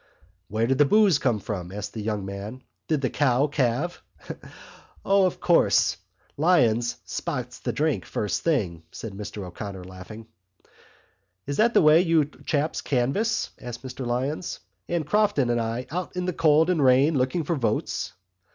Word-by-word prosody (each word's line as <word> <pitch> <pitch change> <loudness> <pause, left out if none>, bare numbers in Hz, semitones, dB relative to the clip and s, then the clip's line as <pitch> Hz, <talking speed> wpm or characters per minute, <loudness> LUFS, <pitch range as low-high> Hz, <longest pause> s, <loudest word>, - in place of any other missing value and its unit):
"Where 110 +2 0
did 135 +3 0
the 145 - +7
boose 200 -2 +4
come 125 -6 +1
from?" 95 -4 -5
asked 105 +1 -6
the 110 - -5
young 105 -2 -2
man. 100 +6 -7 0.2
"Did 155 -3 +1
the 130 - 0
cow 140 -1 +2
calve?" 145 +3 -1 1.0
"O, 195 -1 +4
of 180 - -5
course, 175 - +3 0.4
Lyons 120 -8 +3
spots 125 -7 -4
the - - -2
drink 150 -1 0
first 105 - -2
thing!" 100 - 0
said 110 -3 -7
Mr 105 0 -6
O'Connor, 95 +1 -7
laughing. 95 +5 -10 1.2
"Is 140 0 -3
that 235 +2 +3
the - - +6
way 155 +2 +7
you 165 -4 +3 0.2
chaps 150 0 0
canvass," 145 - 0
said 120 -1 -6
Mr 130 +1 -8
Lyons, 130 +7 -2 0.3
"and 170 -3 -1
Crofton 150 - +2
and 120 0 +1
I 115 +2 -3
out 180 +2 -4
in 180 0 -2
the 180 - -1
cold 160 +2 +4
and 160 -5 +1
rain 135 +4 +5
looking 130 +6 0
for 170 +3 -1
votes?" 115 -6 -2
130 Hz, 160 wpm, -25 LUFS, 110-160 Hz, 1.2 s, the